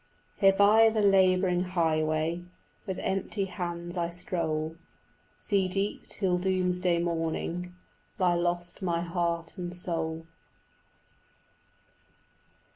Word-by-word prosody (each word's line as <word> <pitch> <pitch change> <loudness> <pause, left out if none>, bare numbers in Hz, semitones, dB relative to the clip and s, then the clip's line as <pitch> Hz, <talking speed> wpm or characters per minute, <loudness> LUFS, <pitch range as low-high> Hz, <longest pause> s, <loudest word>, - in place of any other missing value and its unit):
Here 195 -1 +6
by 210 +3 +6
the 220 -1 0
labouring 185 -2 +4
highway 165 -1 0 0.4
With 190 -2 -3
empty 195 +1 -2
hands 175 -2 -5
I 170 -1 0
stroll: 165 -3 -2 0.6
Sea 195 -3 0
deep, 195 +2 -2
till 180 -3 0
doomsday 180 -1 +1
morning, 170 +1 -2 0.4
Lie 180 -2 +3
lost 175 +2 -2
my 170 -2 0
heart 170 0 -2
and 175 0 -4
soul. 165 -2 -2
175 Hz, 100 wpm, -28 LUFS, 170-190 Hz, 0.6 s, Here